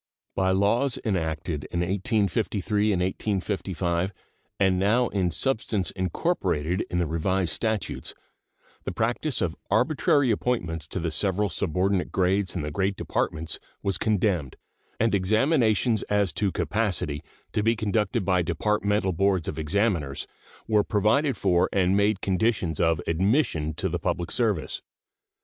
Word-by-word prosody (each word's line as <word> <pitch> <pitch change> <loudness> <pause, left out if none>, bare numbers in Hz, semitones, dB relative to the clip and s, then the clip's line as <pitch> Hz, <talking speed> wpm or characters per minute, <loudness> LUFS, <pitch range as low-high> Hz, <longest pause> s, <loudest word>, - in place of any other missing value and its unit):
By 95 0 +1
laws 110 +8 +2
enacted 80 -5 -2
in 85 - -2
1853 105 +2 0
and 90 -3 +1
1855, 95 -2 -1 0.5
and 95 -2 +3
now 115 +5 +3
in 95 -3 0
substance 110 -4 -1
incorporated 90 - -1
in 90 - -2
the 90 - +2
Revised 85 +2 0
Statutes, 110 -1 -2 0.7
the - - -3
practice 120 +3 -1
of 85 -3 -1
arbitrary 135 +3 +3
appointments 95 -8 -1
to - - -4
the 85 -1 -2
several 100 +5 +1
subordinate 90 +2 0
grades 95 +1 +1
in 85 - -2
the 75 - -3
great 95 +5 0
Departments 80 -3 -2 0.2
was 100 -3 0
condemned, 100 - 0 0.4
and 115 0 +2
examinations 110 - +2
as 100 -2 +2
to 100 -2 0
capacity, 95 -11 -1 0.3
to - - +1
be 115 +2 +2
conducted 105 -1 0
by 90 -1 +3
departmental 100 +3 0
boards 95 0 +1
of 80 - -4
examiners, 80 -4 0 0.4
were 105 -2 +3
provided 110 +8 +2
for 90 -3 +2
and 95 0 +2
made 100 0 +2
conditions 95 -4 0
of 80 -2 +2
admission 85 - +1
to - - -1
the - - -2
public 85 -1 -2
service. 105 -9 0
95 Hz, 135 wpm, -26 LUFS, 85-110 Hz, 0.7 s, and